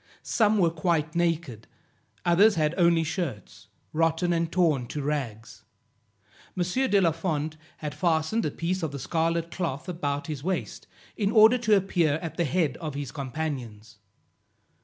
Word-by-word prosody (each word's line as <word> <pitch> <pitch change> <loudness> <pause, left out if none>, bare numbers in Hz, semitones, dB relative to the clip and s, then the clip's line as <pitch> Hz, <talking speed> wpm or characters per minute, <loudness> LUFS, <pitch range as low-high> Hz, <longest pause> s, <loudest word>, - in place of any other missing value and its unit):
Some 215 -1 +2
were 170 -4 +3
quite 160 -2 0
naked; 165 -10 -1 0.6
others 200 +5 +5
had 155 -1 +1
only 170 -2 +4
shirts, 160 - -5 0.3
rotten 165 +2 +1
and 165 -1 -1
torn 155 -9 +2
to 145 +2 -4
rags. 125 -7 -4 0.9
M. 180 - +2 0.3
de 200 - +4
la 170 -4 +3
Fond 155 -2 -2 0.2
had 150 -1 -5
fastened 170 +5 +1
a - - 0
piece 175 +5 -2
of 160 -3 -2
the 140 - -5
scarlet 165 +4 -1
cloth 165 -4 -3
about 145 -5 -2
his 150 -4 -5
waist, 185 +2 -3 0.3
in 205 -2 0
order 220 +3 +6
to 215 -3 +4
appear 175 -5 +1
at 165 0 -5
the 170 - 0
head 160 -2 0
of 155 -4 -6
his 140 -2 -4
companions. 130 -7 -5
165 Hz, 155 wpm, -27 LUFS, 145-175 Hz, 0.9 s, order